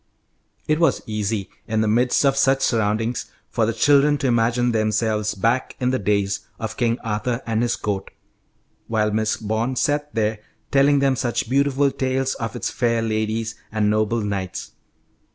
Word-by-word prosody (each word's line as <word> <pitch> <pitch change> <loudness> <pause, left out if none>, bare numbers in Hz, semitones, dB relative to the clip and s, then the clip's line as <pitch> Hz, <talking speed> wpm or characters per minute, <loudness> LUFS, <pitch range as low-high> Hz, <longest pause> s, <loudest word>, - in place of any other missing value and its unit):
It 155 +1 +2
was 165 - +2
easy, 105 -2 -2 0.2
in 110 0 0
the 110 - +1
midst 120 +5 +2
of 135 -1 +3
such 135 0 +3
surroundings, 110 +1 0 0.2
for 115 -3 +1
the - - +1
children 145 +5 +4
to 140 - -4
imagine 120 0 +2
themselves 110 -1 0
back 115 +6 0
in 125 0 +1
the 130 - 0
days 100 -1 0 0.2
of 110 -2 -5
King 120 -2 +1
Arthur 115 +3 -2
and 115 0 0
his 120 - +1
court, 100 -2 -3 0.8
while 105 -1 +1
Miss 110 +1 0
Bond 110 +4 -2
sat 145 +1 0
there 110 -1 0 0.3
telling 140 +1 +4
them 135 -1 +2
such 120 -2 -1
beautiful 140 +2 +2
tales 130 0 -1
of 115 -4 -5
its - - -3
fair 115 -2 0
ladies 110 0 -1 0.2
and 105 -1 +1
noble 110 +2 +1
knights. 100 -3 -4
115 Hz, 165 wpm, -22 LUFS, 110-130 Hz, 0.8 s, children